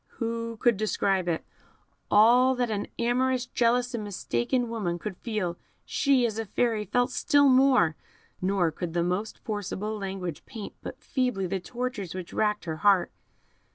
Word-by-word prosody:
Who 230 Hz, 0 st, -3 dB
could 235 Hz, -2 st, +3 dB
describe 195 Hz, -3 st, 0 dB
it? 165 Hz, -2 st, -1 dB, 0.6 s
All 245 Hz, +5 st, +6 dB
that 245 Hz, -2 st, -1 dB
an 205 Hz, -1 st, -2 dB
amorous, 250 Hz, +1 st, +1 dB
jealous, 245 Hz, +1 st, +1 dB
and 230 Hz, -3 st, -3 dB
mistaken 205 Hz, -, -1 dB
woman 205 Hz, -7 st, -2 dB
could 190 Hz, +2 st, -6 dB
feel, 190 Hz, -5 st, -3 dB, 0.3 s
she, 275 Hz, -4 st, +2 dB
as 225 Hz, -1 st, -2 dB
a 225 Hz, -, -2 dB
Fairy, 220 Hz, 0 st, 0 dB
felt 245 Hz, +5 st, +1 dB
still 285 Hz, -1 st, +4 dB
more; 255 Hz, -, +5 dB, 0.5 s
nor 185 Hz, -3 st, +1 dB
could 165 Hz, +1 st, -5 dB
the 170 Hz, -, +2 dB
most 180 Hz, +5 st, -2 dB
forcible 210 Hz, 0 st, -4 dB
language 190 Hz, -5 st, -5 dB
paint 215 Hz, -3 st, -7 dB
but -, -, -8 dB
feebly 250 Hz, -7 st, -1 dB
the 190 Hz, +1 st, -2 dB
tortures 235 Hz, -3 st, -4 dB
which 185 Hz, -2 st, -7 dB
racked 210 Hz, -3 st, 0 dB
her 160 Hz, -2 st, -3 dB
heart. 195 Hz, 0 st, +3 dB
215 Hz, 155 wpm, -27 LUFS, 185-245 Hz, 0.6 s, All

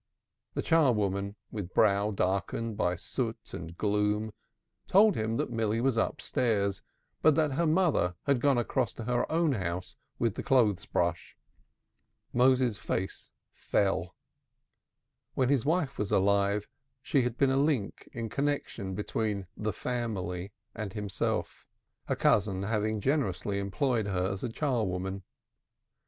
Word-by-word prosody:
The -, -, -1 dB
char 160 Hz, -6 st, +4 dB
woman, 100 Hz, -1 st, -1 dB, 0.2 s
with 100 Hz, -4 st, -6 dB
brow 100 Hz, -1 st, +4 dB
darkened 100 Hz, +3 st, -1 dB
by 90 Hz, -4 st, +1 dB
soot 115 Hz, +5 st, -4 dB
and 85 Hz, +2 st, -7 dB
gloom, 105 Hz, +1 st, +1 dB, 0.6 s
told 205 Hz, +1 st, +6 dB
him 110 Hz, +1 st, -1 dB
that -, -, -1 dB
Milly 115 Hz, -1 st, 0 dB
was 130 Hz, 0 st, +2 dB
upstairs, 105 Hz, -3 st, 0 dB, 0.4 s
but 155 Hz, -2 st, +5 dB
that 155 Hz, -2 st, +2 dB
her 165 Hz, +5 st, +1 dB
mother 155 Hz, -, +2 dB
had 140 Hz, -4 st, +2 dB
gone 140 Hz, -1 st, +4 dB
across 120 Hz, -1 st, 0 dB
to 115 Hz, -, -6 dB
her 120 Hz, +1 st, 0 dB
own 165 Hz, -1 st, +3 dB
house 90 Hz, -6 st, -3 dB, 0.2 s
with 115 Hz, -3 st, +1 dB
the -, -, -4 dB
clothes 110 Hz, -10 st, +2 dB
brush. -, -, -1 dB, 1.0 s
Moses's 125 Hz, -3 st, +3 dB
face 95 Hz, +1 st, -3 dB, 0.2 s
fell. 95 Hz, -3 st, 0 dB, 1.2 s
When 130 Hz, -1 st, +2 dB
his 140 Hz, -3 st, +2 dB
wife 155 Hz, -3 st, 0 dB
was 105 Hz, -1 st, -1 dB
alive, 100 Hz, +1 st, +2 dB, 0.4 s
she 140 Hz, -3 st, +2 dB
had 125 Hz, -1 st, -2 dB
been 135 Hz, -1 st, +3 dB
a 135 Hz, -, +2 dB
link 140 Hz, -8 st, 0 dB
of 115 Hz, -2 st, -4 dB
connection 140 Hz, -9 st, -2 dB
between 105 Hz, -1 st, -2 dB
"The 105 Hz, 0 st, -2 dB
Family" 100 Hz, -6 st, -3 dB, 0.2 s
and 105 Hz, -3 st, -5 dB
himself, 105 Hz, -3 st, -2 dB, 0.4 s
her -, -, 0 dB
cousin 100 Hz, -2 st, +2 dB
having 110 Hz, 0 st, 0 dB
generously 105 Hz, -, 0 dB
employed 110 Hz, +2 st, 0 dB
her 95 Hz, 0 st, 0 dB
as 95 Hz, -, -5 dB
a 125 Hz, -, -1 dB
char 125 Hz, -1 st, 0 dB
woman. 95 Hz, 0 st, -3 dB
110 Hz, 140 wpm, -30 LUFS, 100-130 Hz, 1.2 s, told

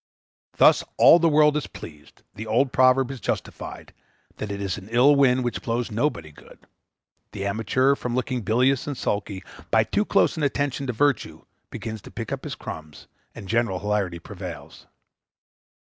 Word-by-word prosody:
Thus -, -, +5 dB
all 170 Hz, -, +8 dB
the 165 Hz, 0 st, +3 dB
world 150 Hz, -1 st, +4 dB
is 150 Hz, -, -2 dB
pleased; 75 Hz, -2 st, -13 dB
the 110 Hz, +2 st, -8 dB
old 125 Hz, +5 st, +2 dB
proverb 130 Hz, 0 st, +3 dB
is 135 Hz, -, -7 dB
justified, -, -, -5 dB, 0.4 s
that 105 Hz, -, -5 dB
it 100 Hz, -, -4 dB
is 100 Hz, 0 st, -3 dB
an 95 Hz, +2 st, -14 dB
ill 125 Hz, +5 st, +5 dB
wind 130 Hz, -2 st, +3 dB
which 120 Hz, -, -3 dB
blows 120 Hz, -1 st, -2 dB
nobody 105 Hz, -, -2 dB
good; 75 Hz, -, -18 dB, 0.7 s
the 100 Hz, -, -4 dB
amateur, 115 Hz, +7 st, +1 dB
from 125 Hz, -3 st, -4 dB
looking 130 Hz, -1 st, -2 dB
bilious 125 Hz, +6 st, +1 dB
and 145 Hz, -3 st, -4 dB
sulky, 100 Hz, -4 st, -3 dB, 0.3 s
by -, -, +4 dB
too -, -, 0 dB
close -, -, +2 dB
an -, -, -3 dB
attention 140 Hz, -1 st, -1 dB
to -, -, 0 dB
virtue, 145 Hz, +4 st, 0 dB, 0.2 s
begins 110 Hz, -2 st, -6 dB
to -, -, -12 dB
pick -, -, -7 dB
up -, -, -4 dB
his -, -, -5 dB
crumbs, 75 Hz, -2 st, -9 dB, 0.3 s
and 95 Hz, -, -9 dB
general 115 Hz, -3 st, 0 dB
hilarity 100 Hz, -3 st, -1 dB
prevails. 90 Hz, -1 st, -10 dB
120 Hz, 170 wpm, -24 LUFS, 100-135 Hz, 0.7 s, all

